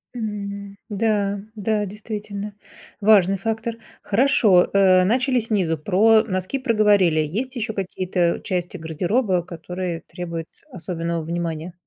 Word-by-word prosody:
М. 200 -3 -5
Да, 205 -1 0 0.2
да, 210 0 0
действительно, 210 0 -6 0.5
важный 195 -2 +5
фактор. 225 +3 -3 0.3
Хорошо, 210 -5 +4
э, 185 -2 +5
начали 255 +6 +2
снизу, 200 -8 0
про 215 +7 +4
носки 185 +4 -2
проговорили. 210 - +3
Есть 225 - -2
еще 220 -2 -3
какие-то 185 -2 -1
части 180 0 -3
гардероба, 180 - 0
которые 175 0 -5
требуют 170 -3 -6 0.2
особенного 170 -1 -3
внимания? 170 0 -4
195 Hz, 110 wpm, -22 LUFS, 175-215 Hz, 0.5 s, важный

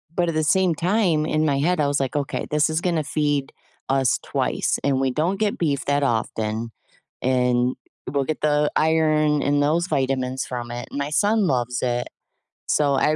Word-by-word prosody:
But 175 -1 +1
at 160 - -3
the 155 - +1
same 185 +1 +3
time, 175 -3 +1
in 155 0 +1
my 140 -2 +1
head, 175 +3 +1
I 145 - +2
was 140 0 0
like, 135 +1 -2
"Okay, 140 -2 -2
this 150 +1 +2
is 160 +2 -1
gonna 170 -5 0
feed 145 -1 -1 0.4
us 135 -2 +2
twice, - - -1
and 135 -2 +1
we 135 -1 +1
don't 175 +9 -1
get 210 -2 0
beef 140 -6 -1
that 145 0 +1
often, 110 -2 -1 0.5
and 125 -1 +1 0.3
we'll 140 -1 0
get 155 +2 -4
the 150 0 +2
iron 155 -2 +2
and 145 0 +2
those 165 +5 +1
vitamins 130 -2 -1
from 120 -1 -5
it, 120 0 -6
and - - -5
my 140 +1 -2
son 205 +4 +2
loves 125 -2 -1
it." 120 -1 -1 0.6
So, 145 -2 +2
I 150 +3 +2
145 Hz, 190 wpm, -23 LUFS, 130-155 Hz, 0.6 s, same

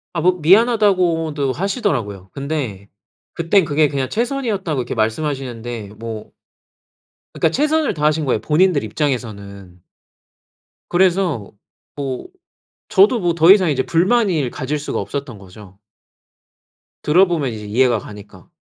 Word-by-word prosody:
아 165 - 0
뭐 180 +2 +2
미안하다고도 180 - +3
하시더라고요. 125 - -2
근데 135 -9 -4 0.5
그때는 170 +3 +2
그게 150 0 +2
그냥 135 -2 -2
최선이었다고 220 - -2
이렇게 - - -5
말씀하시는데 120 -2 -3
뭐 115 -2 -7 1.1
그러니까 160 - +3
최선을 300 - +1
다하신 150 0 +1
거예요 130 -5 0
본인들 160 - +2
입장에서는. 100 - -4 1.1
그래서 175 - +1 0.4
뭐 135 - -5 0.6
저도 385 - +4
뭐 175 -3 0
더 170 +2 +6
이상 190 -4 +5
이제 130 -2 0
불만을 180 - +2
가질 140 +3 -3
수가 150 - -3
없었던 140 -6 -5
거죠. 95 0 -15 1.2
들어 175 +6 +5
보면 155 -7 -1
이제 105 -2 -8
이해가 120 +2 +2
가니까. 100 -4 -13
150 Hz, 310 characters per minute, -19 LUFS, 115-180 Hz, 1.2 s, 더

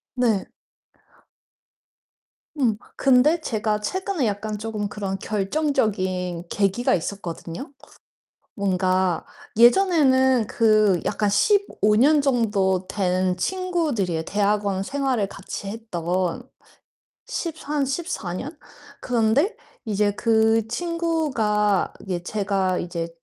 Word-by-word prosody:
네. 230 -6 +1 2.1
음 245 -7 +2 0.2
근데 275 +5 +4
제가 215 -6 -1
최근에 375 - -2
약간 210 0 -2
쪼금 210 -1 -4
그런 195 -2 -4
결정적인 195 - -1
계기가 200 +4 +1
있었거든요. 180 - -6 0.8
뭔가 185 -2 +1 0.3
예전에는 260 - +4
그 215 -5 +3
약간 210 0 0
15 215 - +2
년 290 +6 +5
정도 205 -8 +1
된 185 -2 0
친구들이에요, 295 - -1
대학원 200 0 0
생활을 260 -3 -1
같이 195 0 -8
했던. 185 0 -3 0.8
13, 300 -4 -3
14 275 - -3
년 290 - -6 0.4
그런데 245 - +1 0.3
이제 210 -1 +1
그 220 +1 +2
친구가 265 - 0
예 175 -2 -2
제가 195 -2 -1
이제 170 -1 -4
215 Hz, 185 characters per minute, -23 LUFS, 190-265 Hz, 2.1 s, 년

